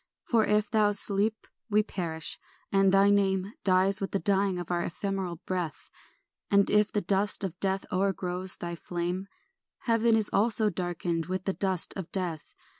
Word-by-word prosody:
For 225 -2 +2
if 210 0 +1
thou 210 -2 +3
sleep, 205 +2 +1 0.2
we 210 0 +3
perish, 165 -6 -5 0.3
and 195 -1 +4
thy 195 +1 +5
name 195 0 +1
Dies 190 +1 +3
with 195 - -3
the - - +3
dying 195 -2 +1
of 175 -1 -5
our 175 -1 0
ephemeral 190 0 -3
breath; 180 -4 -4 0.6
And 200 0 +3
if 210 0 +3
the 205 - 0
dust 200 +3 +2
of 180 -2 -4
death 195 0 0
o'ergrows 185 -1 -1
thy 170 0 -5
flame, 175 +2 -4 0.5
Heaven 230 -1 +3
also 215 0 +3
is - - -8
darkened 170 -2 -2
with 185 0 -3
the 195 - 0
dust 190 -3 0
of 190 -4 -6
death. 175 -5 -3
195 Hz, 165 wpm, -28 LUFS, 180-205 Hz, 0.6 s, thy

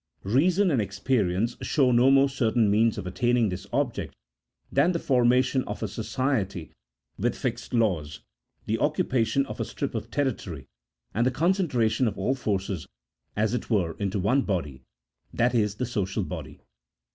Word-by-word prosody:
Eeason 175 - +3
and 125 - +2
experience 105 +1 0
show 135 -4 +2
no 120 +2 +5
more 135 0 +5
certain 115 -5 +1
means 110 +2 +3
of 100 - -5
attaining 120 +4 +1
this 95 +2 -6
object 130 -2 -2 0.6
than 145 +7 +3
the - - 0
formation 130 -2 +2
of 105 +2 -5
a - - 0
society 110 - -2 0.5
with - - 0
fixed - - -4
laws, 90 - 0 0.4
the 110 +1 -1
occupation 140 -4 +1
of - - -8
a - - 0
strip 140 - -4
of 115 -1 -4
territory, 115 - -2 0.5
and 115 - +1
the 130 - +2
• - - -11
concentration 135 - +2
of 105 - -3
all 100 +7 +1
forces, 100 - -2 0.5
as 105 +1 +1
it 125 - -3
were, 90 -8 +1
into 100 0 -1
one 105 +9 +2
body, 80 - -3 0.5
that 120 +1 +1
is 105 -3 +1
the 125 - -2
social 100 -5 -2
body. - - -7
115 Hz, 160 wpm, -26 LUFS, 100-130 Hz, 0.6 s, no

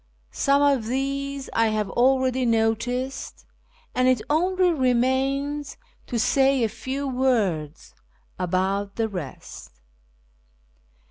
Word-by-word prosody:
Some 280 +1 +2
of 275 -6 +2
these 275 +2 -2
I 230 0 +3
have 215 -1 -1
already 260 0 +2
noticed, 235 +3 -1 0.5
and 255 0 +2
it 255 -2 +3
only 365 +3 +2
remains 270 +2 0 0.3
to 245 - -2
say 270 +2 +3
a 225 - +1
few 275 +5 -4
words 215 - -1 0.5
about 190 +3 -1
the 225 -1 0
rest. 150 - -9
255 Hz, 105 wpm, -24 LUFS, 220-275 Hz, 0.5 s, I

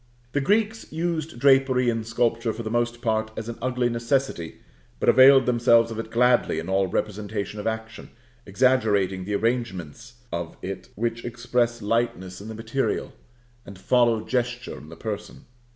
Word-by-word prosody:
The 145 - 0
Greeks 220 +6 0
used 160 -3 -3
drapery 135 -1 +4
in 115 -1 0
sculpture 115 0 0
for 115 - -6
the 110 - -4
most 120 0 -1
part 110 -2 0
as 110 - -5
an 120 - -6
ugly 125 -1 0
necessity, 120 - -1 0.4
but - - +2
availed 130 +1 +7
themselves 115 -1 +4
of 115 - -5
it 115 - -5
gladly 120 -6 +3
in 80 +3 -4
all 95 0 +2
representation 105 +1 -3
of 105 - -3
action, 110 0 -5 0.3
exaggerating 100 -5 +1
the 105 +1 -2
arrangements 115 -1 -3 0.2
of 85 -1 -5
it 95 -1 -6
which 115 +2 -2
express 120 -1 -1
lightness 105 -4 -1
in 105 - -9
the 110 - -7
material, 115 +5 -2 0.5
and 100 -4 -11
follow 120 +2 +2
gesture 120 -1 -2
in 75 +4 -12
the 80 - -10
person. 105 0 -6
115 Hz, 160 wpm, -25 LUFS, 105-125 Hz, 0.5 s, availed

